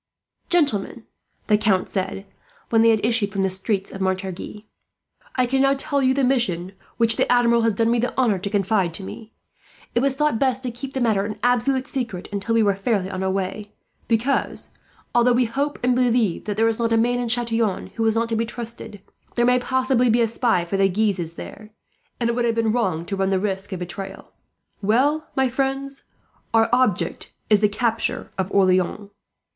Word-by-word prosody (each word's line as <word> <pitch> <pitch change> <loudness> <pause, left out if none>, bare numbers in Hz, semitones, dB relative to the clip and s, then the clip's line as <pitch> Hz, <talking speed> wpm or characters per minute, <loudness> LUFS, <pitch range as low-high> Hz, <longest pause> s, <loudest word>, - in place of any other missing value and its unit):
"Gentlemen," 270 - +1 0.4
the 210 -1 +3
Count 200 -3 +2
said, 195 0 -3 0.5
when 225 -1 +4
they 230 - +5
had 220 -2 +2
issued 225 -3 +1
from 195 0 -1
the 190 - 0
streets 195 +1 -1
of 195 - -7
Montargis, 190 +2 -3 0.7
"I 255 - +2
can 265 +2 +1
now 275 0 +4
tell 280 +1 0
you 260 0 +3
the 275 - +1
mission 230 -9 0 0.3
which 230 -1 +3
the - - +1
Admiral 235 -1 +4
has 225 -1 +2
done 225 +3 +1
me 240 - +2
the 245 +2 -2
honour 230 -7 +2
to 200 - -4
confide 195 -4 +1
to 195 - -6
me. 220 +3 -9 0.6
It - - +2
was 270 +1 +1
thought 300 -5 +1
best 260 -1 +1
to 250 - -3
keep 260 +3 -8
the 265 - -2
matter 215 -5 +2
an 210 +1 -5
absolute 250 +2 +2
secret, 235 -10 -4
until 205 +3 -1
we 225 - +4
were 200 -1 +3
thus 195 - -13
fairly 195 -4 0
on 185 - -4
our 190 - 0
way; 195 +2 -3 0.3
because, 235 +4 0 0.4
although 240 +1 +4
we 245 +1 +3
hope 280 +6 -2
and 250 0 +3
believe 240 -6 +1
that 210 -1 -3
there 225 +1 +3
is 225 0 0
not 230 -1 0
a 225 - +4
man 245 +2 +2
at 240 -1 -2
Chatillon 230 -3 0
who 225 - -1
is 220 - +2
not 230 +1 +1
to 225 - 0
be 225 - +1
trusted, 230 -4 -7 0.3
there 240 - +2
may 250 +1 +4
possibly 260 -1 +1
be 235 +2 +3
a 230 - +3
spy 230 -4 +1
of 170 - -9
the 195 0 +3
Guises 185 -4 -1
there, 210 +4 -10 0.5
and 235 - 0
it 235 - 0
would 240 -1 0
have 230 -1 +1
been 225 -1 +1
wrong 185 -8 -1
to 195 - -3
run 195 0 0
the 190 - +2
risk 195 0 -3
of 190 - -3
betrayal. 195 +2 -7 0.5
"Well, 270 +9 +1
my 265 -1 +3
friends, 270 +2 -3 0.5
our 225 0 +4
object 210 -9 +1 0.2
is 210 - +6
the 210 0 +3
capture 230 +2 -1
of 190 +1 -1
Orleans." 190 +1 +1
225 Hz, 210 wpm, -22 LUFS, 195-245 Hz, 0.7 s, is